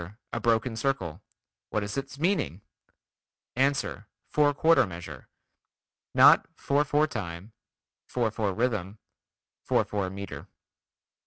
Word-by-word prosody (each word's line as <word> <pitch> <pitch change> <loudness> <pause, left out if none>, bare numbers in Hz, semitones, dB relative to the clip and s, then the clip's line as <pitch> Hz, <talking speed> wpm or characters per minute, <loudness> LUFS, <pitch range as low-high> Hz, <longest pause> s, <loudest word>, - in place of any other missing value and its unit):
A 120 - -1
broken 115 0 +1
circle. 110 - -2 0.5
What 105 - -1
is 100 0 -5
its 135 0 -5
meaning? 145 - 0 0.9
Ans. 135 +2 +2 0.4
Four 150 -1 +3
quarter 165 -5 +4
measure. 85 -6 -9 0.9
(Not - - +7
four 140 +1 +1
four 150 +1 +2
time, 95 - -6 0.5
four 120 -3 0
four 105 -2 -1
rhythm, 110 -2 -1 0.7
four - - +2
four 100 -3 -2
meter.) 100 +1 -7
110 Hz, 110 wpm, -28 LUFS, 95-140 Hz, 0.9 s, Not